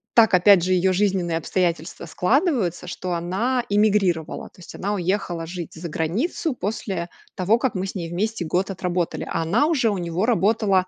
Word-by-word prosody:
Так 225 -4 +6
опять 180 0 +6
же 185 +1 +1
ее 185 +1 +3
жизненные 185 -3 +1
обстоятельства 170 -1 -2
складываются, 195 - 0
что 180 0 -4
она 195 +9 -1
иммигрировала. 200 -6 +1
То - - -23
есть 170 - -11
она 205 +2 -2
уехала 175 -2 -2
жить 170 -1 -7
за 170 +1 -6
границу 215 - -1
после 190 -4 -3 0.3
того, 195 +5 +2
как 255 0 -1
мы 185 +1 -1
с 195 - -6
ней 170 -3 -4
вместе 200 +2 -2
год 180 +5 -1
отработали. 180 -2 -2
А 165 - 0
она 215 - +2
уже 275 -8 +2
у 205 - -1
него 175 +3 -1
работала, 205 -4 +2
185 Hz, 175 wpm, -23 LUFS, 175-210 Hz, 0.3 s, Так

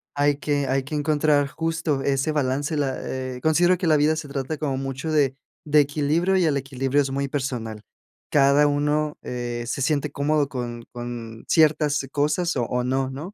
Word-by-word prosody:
hay 145 0 +3
que 145 -1 -1
hay 135 0 +1
que 150 +3 -5
encontrar 150 -1 +2
justo 160 -2 -2
ese 140 +2 0
balance, 140 +1 0
la 140 -3 -1
eh, 130 -1 -5
considero 175 +4 +3
que 175 -1 -2
la 155 - +5
vida 150 +2 +3
se 155 - -5
trata 140 +2 -3
como 140 -3 -2
mucho 135 +3 -4
de 140 -3 +2 0.3
de 150 -1 +4
equilibrio 150 +6 +1
y 185 - +3
el 150 -4 +2
equilibrio 135 +1 0
es 135 -1 -2
muy 140 0 -2
personal. 120 -6 -4 0.5
Cada 140 +1 +5
uno, 150 +1 0
eh, 120 -1 -4
se 125 +3 -3
siente 150 0 0
cómodo 145 0 +1
con 120 -2 -5
con 120 -2 -7
ciertas 150 -3 +3
cosas 150 +3 0
o 120 - +1
o 125 +1 -1
no, 130 +1 0
¿no? 155 +9 -7
145 Hz, 185 wpm, -24 LUFS, 130-150 Hz, 0.5 s, la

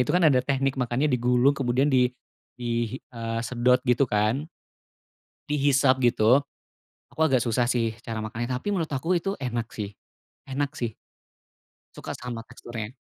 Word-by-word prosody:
itu - - -1
kan 180 - +3
ada 135 -5 +5
teknik 135 0 0
makannya, 125 +4 +1
digulung 125 +2 +3
kemudian 135 +1 +1
di 125 -1 +5 0.5
di, 120 0 -2
hi - - -9
eee, 115 -1 -3
sedot 125 +2 +3
gitu, 125 +1 +3
kan. 110 +9 +1 1.0
Dihisap 135 -2 +3
gitu. 120 +2 +4 0.7
Aku 160 - -4
agak 130 -5 +3
susah 120 +1 +1
sih 115 -3 +1
cara 115 -2 -3
makannya, 110 +2 -4
tapi 125 +11 -3
menurut 165 -4 -1
aku 165 +7 +1
itu 195 +3 -2
enak 120 -3 -2
sih 105 -2 -5 0.6
enak 140 +2 -1
sih. 120 -6 -3 1.0
Suka - - -6
sama 120 -2 -6
teksturnya. 120 -3 -7
125 Hz, 150 wpm, -26 LUFS, 115-140 Hz, 1.0 s, ada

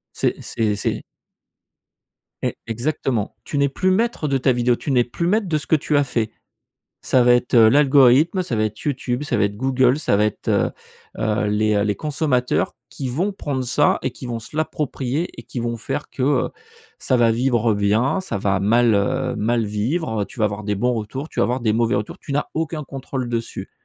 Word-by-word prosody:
C'est - - 0
c'est 110 -2 -1
c'est 105 - -2 1.4
E - - -1
exactement. 120 -2 -2
Tu 145 - -4
n'es 140 0 +3
plus 185 +7 0
maître 225 -5 0
de 135 -1 +1
ta 130 0 +2
vidéo, 120 0 +2
tu 140 - -4
n'es 125 -2 +4
plus 135 +8 -3
maître 210 +2 +1
de 160 -3 +1
ce 145 - -7
que - - +4
tu 150 0 -1
as 145 - +4
fait. 115 -5 -2 0.7
Ça 130 - +3
va 120 0 +6
être, 120 0 0
heu, 115 -2 +7
l'algorithme, 140 - +5
ça 125 - -3
va 110 - +1
être 110 0 -3
YouTube, 130 -2 -2
ça 150 - -1
va - - +3
être 100 0 -1
Google, 130 +2 +2
ça 130 - +1
va 105 +1 +3
être, 105 - -4
heu, - - +2 0.5
heu, 110 0 0
les, 105 +1 +1
heu, 100 - +2
les 105 -1 0
consommateurs, 145 -5 0
qui 135 -2 -5
vont 180 +11 -1
prendre 140 -8 -3
ça 145 +4 +2
et 130 - -1
qui 125 - -10
vont 120 -2 -3
se 115 - -12
l'approprier 150 0 -2
et - - -8
qui 125 - -6
vont 120 0 -2
faire 135 +5 -4
que, 130 - -4
heu, 140 -1 +2 0.5
ça 130 - +1
va 120 -1 +4
vivre 120 -1 +2
bien, 105 - +1
ça 185 - -4
va 95 -1 0
mal, 115 +3 +4
heu, 100 0 0
mal 115 +1 0
vivre, 110 +4 -1
heu, - - -1
tu 125 - -13
vas 110 - +3
avoir 105 0 -3
des 105 0 -1
bons 125 +5 +1
retours, 120 +6 -4
tu - - -5
vas - - +4
avoir 125 +2 0
des 110 -3 +1
mauvais 115 +1 +2
retours. 105 +1 -3
Tu - - -8
n'as 145 +1 0
aucun 160 -1 -2
contrôle 135 -2 -5
dessus 115 -1 -4
125 Hz, 220 wpm, -21 LUFS, 110-145 Hz, 1.4 s, heu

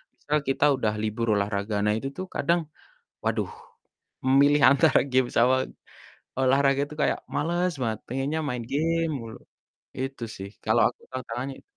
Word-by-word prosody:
misal 150 +1 -1
kita 140 +2 +2
udah 110 -5 0
libur 110 +2 -2
olahraga, 100 +1 -1
nah, 105 - +3
itu 135 +5 -4
tuh 185 - -3
kadang, 170 +1 +2 0.6
waduh, - - 0 0.8
memilih 140 +2 +5
antara 140 - +4
game 130 -1 +3
sama 125 +2 +5 0.8
olahraga 135 +1 +3
itu 150 - -10
kayak - - +1 0.2
males 175 +3 0
banget, 110 -2 -1
pengennya 135 +5 -2
main 125 -2 -3
game 165 +2 +1
mulu. 115 -1 -8 0.6
Itu 135 -2 -4
sih, 95 +1 -7 0.2
kalau - - +3
aku - - -16
tantangannya 130 +1 -5
i - - -22
130 Hz, 150 wpm, -26 LUFS, 115-145 Hz, 0.8 s, memilih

